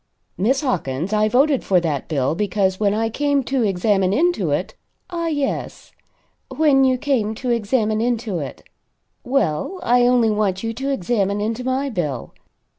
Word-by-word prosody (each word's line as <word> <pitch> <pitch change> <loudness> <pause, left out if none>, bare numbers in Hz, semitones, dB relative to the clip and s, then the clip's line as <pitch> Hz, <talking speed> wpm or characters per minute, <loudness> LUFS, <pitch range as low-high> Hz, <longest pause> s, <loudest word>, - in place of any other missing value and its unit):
"Miss 255 +9 +1
Hawkins, 175 - -2
I 215 0 +2
voted 270 +3 +3
for 185 -2 +3
that 155 -5 -2
bill 140 -2 0
because 190 0 0
when 205 -2 +2
I 220 +2 0
came 285 +4 0
to 265 +1 -1
examine 195 -2 +1
into 345 +9 +1
it - - -1 0.2
" - - -49
"Ah 335 -1 -2
yes. 290 -4 -3 0.6
When 290 -4 +3
you 260 -1 +3
came 245 -6 0
to 250 +2 -3
examine 220 -1 0
into 230 -6 -1
it. 140 -3 -7 0.6
Well, 250 - -1
I 245 0 +4
only 240 -3 +3
want 205 -2 0
you 225 0 -2
to 265 +4 -4
examine 200 -4 0
into 225 +4 -2
my 265 +2 -1
bill. 150 - -3
Mr. - - -32
225 Hz, 170 wpm, -21 LUFS, 195-265 Hz, 0.6 s, I